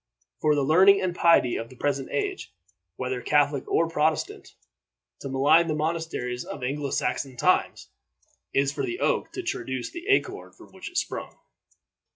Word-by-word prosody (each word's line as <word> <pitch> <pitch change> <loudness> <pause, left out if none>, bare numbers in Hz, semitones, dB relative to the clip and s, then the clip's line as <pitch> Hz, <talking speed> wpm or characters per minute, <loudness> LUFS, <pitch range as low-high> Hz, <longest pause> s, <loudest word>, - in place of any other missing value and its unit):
For 150 -1 +2
the 145 - +1
learning 190 +7 +6
and 185 -2 -1
piety 165 -9 +4
of 115 - -6
the 130 - -14
present 135 0 -2
age, 400 -2 -3 0.4
whether 130 -1 -3
Catholic 145 -1 +2
or 165 - +2
Protestant, 155 -1 -1 0.6
to 135 - -6
malign 145 +6 +4
the 155 - -1
monasteries 155 -6 -3
of - - -8
Anglo 140 +2 -2
Saxon 130 0 -2
times - - +1 0.6
is 140 0 +1
for - - -3
the 355 +2 -3
oak - - 0
to 375 - -5
traduce 130 - -4
the 345 +3 -9
acorn 405 - 0
from - - -17
which - - -9
it 355 - -7
sprung. - - -3
150 Hz, 165 wpm, -26 LUFS, 130-170 Hz, 0.6 s, learning